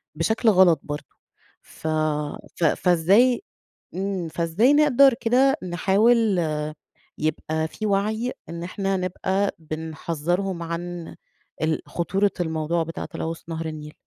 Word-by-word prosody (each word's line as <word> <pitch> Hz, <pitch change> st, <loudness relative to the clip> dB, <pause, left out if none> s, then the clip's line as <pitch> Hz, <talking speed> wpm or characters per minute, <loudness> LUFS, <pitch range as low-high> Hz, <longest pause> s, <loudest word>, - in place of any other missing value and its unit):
بشكل 220 Hz, +8 st, +2 dB
غلط 185 Hz, -6 st, +5 dB
برضه، 145 Hz, 0 st, -7 dB, 0.5 s
ف 160 Hz, -, -9 dB, 0.7 s
ف -, -, -4 dB
فإزاي 190 Hz, -, +4 dB, 0.5 s
إمم 190 Hz, -2 st, -2 dB
فإزاي 170 Hz, -, +2 dB
نقدر 280 Hz, -3 st, +6 dB
كده 255 Hz, +4 st, +3 dB
نحاول 200 Hz, +3 st, +3 dB, 0.8 s
يبقى 155 Hz, +1 st, -1 dB
في 215 Hz, +6 st, -6 dB
وعي 215 Hz, +5 st, 0 dB, 0.2 s
إن 170 Hz, 0 st, -6 dB
إحنا 195 Hz, +2 st, -2 dB
نبقى 190 Hz, +2 st, -1 dB
بنحذّرهم 165 Hz, +3 st, -3 dB
عن 170 Hz, 0 st, -5 dB, 0.5 s
ال 160 Hz, 0 st, 0 dB
خطورة 195 Hz, +4 st, 0 dB
الموضوع 160 Hz, 0 st, 0 dB
بتاع 165 Hz, +1 st, -6 dB
تلوث 165 Hz, 0 st, -5 dB
نهر 165 Hz, 0 st, -4 dB
النيل؟ 150 Hz, -1 st, -6 dB
175 Hz, 110 wpm, -24 LUFS, 160-205 Hz, 0.8 s, نقدر